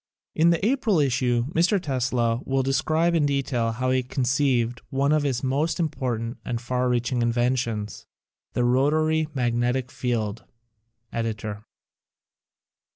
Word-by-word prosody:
(In 165 +2 +4
the 170 +3 +1
April 230 -5 +2
issue 125 -3 +1
Mr. 180 +5 +3
Tesla 125 -6 0
will 135 0 0
de 135 +1 0
scribe 160 +4 +2
in 155 -3 +3
detail 130 -5 0
how 130 +2 -1
he 130 0 +2
conceived 125 -2 0
one 140 +1 +1
of 155 0 +3
his 135 -4 -1
most 150 +5 0
important 125 -7 -2
and 120 - -3
far 125 +1 -1
reaching 120 0 0
inventions: 120 -3 -1 0.5
"The 125 - +1
Rotary 155 +5 +2
Magnetic 125 +1 0
Field." 115 -4 -2 0.3
— 115 +1 -37
Editor.) 110 -2 -4
125 Hz, 135 wpm, -25 LUFS, 120-145 Hz, 0.5 s, In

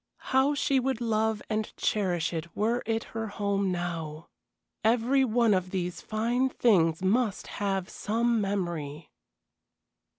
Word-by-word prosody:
How 265 +3 +4
she 275 -1 +2
would 260 -1 -1
love 220 -2 0
and 215 -1 -2
cherish 180 -5 0
it 165 0 -5
were 230 +4 +1
it 225 0 0
her 225 0 -3
home 200 -2 -1
now! 165 -3 -4 0.5
Every 240 +4 +3
one 235 -2 +3
of 185 -1 0
these 180 -2 -3
fine 235 +4 0
things 180 -10 +3
must 210 +2 +1 0.2
have 195 -2 0
some 230 +1 0
memory. 170 -7 -3
210 Hz, 130 wpm, -28 LUFS, 180-235 Hz, 0.5 s, How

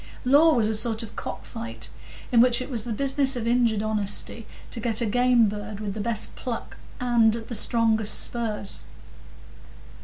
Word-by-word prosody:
Law 300 +5 +5
was 225 -3 +2
a 220 - -1
sort 225 +1 +1
of 220 - -11
cock - - -7
fight, 230 0 -7 0.4
in 235 -2 +5
which 245 -1 +4
it 255 +3 -6
was 230 -3 -1
the 240 - -5
business 275 +3 +2
of 235 -2 -4
injured 235 -3 +1
honesty 215 +1 0 0.2
to 235 - -5
get 225 -1 0
a 235 - 0
game 245 +1 +3
bird 205 0 -6
with 205 -2 -4
the 215 - -5
best 220 0 -2
pluck 240 -3 -6 0.2
and 235 -3 +3
the 230 +1 -6
strongest 220 -1 +2
spurs. 220 -4 -2
230 Hz, 175 wpm, -24 LUFS, 215-245 Hz, 0.4 s, Law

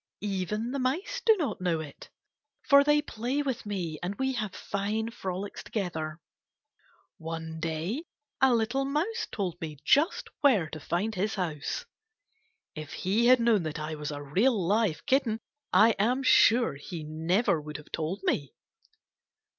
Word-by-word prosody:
Even 210 +4 -2
the 275 - -2
mice 345 - -1
do 445 -2 +5
not 305 - -2
know 175 -3 +1
it, 150 -3 -9 0.5
for 280 -1 +7
they 295 +1 +3
play 255 +2 -2
with 260 -5 -3
me 175 -7 -3
and 185 +3 -3
we 265 +4 0
have 215 -5 -3
fine 215 +3 -2
frolics 190 -1 -5
together. 165 -6 -3 1.0
One 160 0 -5
day 165 - -2 0.4
a 265 -1 +6
little 240 +4 +1
mouse 320 +12 -1
told 180 -5 -3
me 155 -2 -5
just 315 +8 +3
where 235 - +4
to 155 - -6
find 180 +9 -1
his 210 +2 -1
house. 160 -7 -3 0.9
If 155 -1 -7
he 215 +6 +1
had 255 0 +7
known 230 -4 +3
that 155 -1 -4
I 155 +1 -4
was 150 -1 -4
a 145 -1 -5
real, 205 - +2
live 205 -5 +1
kitten, 245 -5 +2 0.3
I 225 +2 +6
am 250 +6 +2
sure 235 - +5
he 155 +4 -7
never 160 +4 +1
would 150 0 -6
have 150 - -14
told 165 +5 -3
me. 145 -7 -1
200 Hz, 155 wpm, -29 LUFS, 160-250 Hz, 1.0 s, for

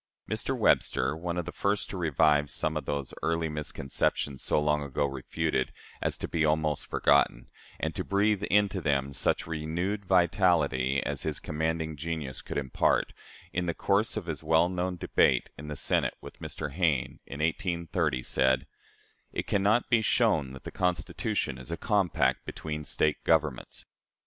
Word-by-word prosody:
Mr. - - -2
Webster, - - +2
one 85 +1 -3
of 90 - -1
the - - -5
first 100 +1 0
to - - -5
revive 75 -3 +3
some 80 +3 -2
of 75 - -3
those 70 -2 -3
early 80 0 0
misconceptions 75 -2 -2
so - - +1
long 75 0 +2
ago 70 0 -1
refuted 70 +1 -1 0.3
as - - -1
to - - -4
be 80 -1 0
almost 75 -1 +1
forgotten, 70 -4 +2 0.3
and 80 0 -1
to - - -3
breathe 100 0 +2
into 100 -2 +3
them 70 -3 0
such - - 0
renewed 85 +6 -2
vitality 85 -7 +3
as - - -2
his - - -2
commanding 80 0 -2
genius 75 -3 -4
could - - -5
impart, 65 -2 +1 0.4
in 90 +1 -1
the 85 - -1
course 105 +3 +1
of 105 - -3
his 80 -2 -4
well 80 +2 +4
known 90 0 -2
debate 65 -6 +2
in 75 - -9
the 75 - -4
Senate - - 0
with - - -11
Mr. 75 -2 -5
Hayne, 75 -6 0
in 70 - -7
1830, 85 - 0
said: 65 +1 +2 0.7
"It - - -3
can 100 - +1
not 105 +5 +3
be 115 -2 +5
shown 75 -9 +2
that 65 - -10
the - - -7
Constitution 85 -7 -1
is 65 - -11
a 85 - -3
compact 85 - +1
between 75 -1 -5
State 75 +1 0
governments. 80 -6 0
80 Hz, 165 wpm, -29 LUFS, 70-90 Hz, 0.7 s, be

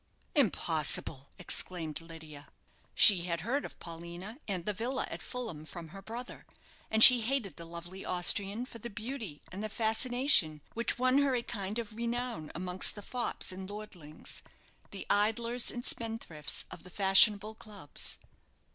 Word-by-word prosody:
"Impossible!" 160 - +1
exclaimed 170 -3 -3
Lydia. 160 -3 -11 0.5
She 185 -6 +8
had 170 -2 -2
heard 260 - -1
of - - -10
Paulina 170 - -9
and 185 -4 -3
the 210 - -1
villa 245 +6 -2
at - - -6
Fulham 225 -12 -6
from 160 +2 -9
her 195 +4 -11
brother, 235 +5 -9 0.4
and 220 0 +6
she 250 -2 +11
hated 225 - -2
the 170 - -8
lovely 170 +3 -9
Austrian 195 +5 0
for 235 -3 -11
the 235 - -7
beauty 220 - -7
and 195 +3 -6
the 215 - -3
fascination 225 - +2
which 235 -2 0
won 255 +2 +3
her 280 -2 +2
a 240 - -1
kind 205 -2 -4
of 225 -2 -5
renown 235 -7 -3
amongst 180 +1 0
the 205 - -9
fops 245 -3 -2
and 190 +1 -8
lordlings 195 -8 -8 0.5
the 195 - -7
idlers 230 +4 +1
and 245 0 -4
spendthrifts 225 -10 -1
of - - -9
the 180 - -13
fashionable 200 +3 +5
clubs. 210 -8 -7
205 Hz, 155 wpm, -31 LUFS, 170-235 Hz, 0.5 s, she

